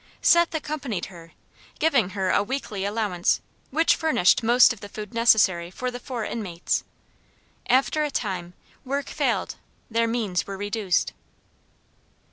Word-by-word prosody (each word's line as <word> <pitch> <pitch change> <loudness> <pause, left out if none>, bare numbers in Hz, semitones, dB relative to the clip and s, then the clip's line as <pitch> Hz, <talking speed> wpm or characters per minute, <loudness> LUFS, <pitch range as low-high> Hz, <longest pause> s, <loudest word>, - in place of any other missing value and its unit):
Seth 340 0 +4
accompanied 280 - -3
her, 165 -1 -13 0.4
giving 275 - +2
her 190 -1 +1
a - - +3
weekly 210 -4 -4
allowance 205 -4 0 0.3
which 320 +4 +3
furnished 310 - +3
most 240 +2 +6
of 230 - -13
the 205 - -9
food 210 +2 -8
necessary 205 -7 +3
for 250 +7 -4
the 245 - -7
four 245 -3 -5
inmates. 185 -7 -2 0.8
After 270 +4 +2
a 300 - -1
time, 185 -9 -4 0.3
work 275 +2 -2
failed; - - -1 0.3
their 230 +1 +2
means 220 -6 -1
were 195 -1 -5
reduced. 205 -2 -1
225 Hz, 135 wpm, -25 LUFS, 190-255 Hz, 0.8 s, most